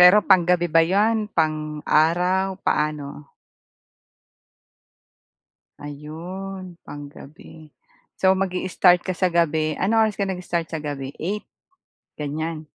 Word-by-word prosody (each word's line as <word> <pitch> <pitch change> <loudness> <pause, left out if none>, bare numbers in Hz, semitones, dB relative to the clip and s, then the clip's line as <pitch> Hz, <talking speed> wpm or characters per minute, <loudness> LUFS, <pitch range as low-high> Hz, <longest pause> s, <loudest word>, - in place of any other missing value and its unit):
Pero 180 +4 +9
panggabi 175 -1 +4
ba 165 0 +4
yan, 210 +5 +1
pang-araw? 160 +5 +1
Paano? 150 -1 -2 2.5
Ayun 175 +6 -8
pang-gabi. 145 +2 -12 0.5
So, 190 0 +4
mag-i-start 185 -1 +2
ka 185 - -1
sa 180 +1 +1
gabi. 160 -2 +1
Anong 220 +3 +3
oras 210 - -14
ka 200 - 0
nag-start 180 -3 -3
sa 160 -2 -5
gabi? 140 -2 -5
8, 205 +5 -3 0.7
ganyan? 155 +2 -4
170 Hz, 100 wpm, -23 LUFS, 155-190 Hz, 2.5 s, Pero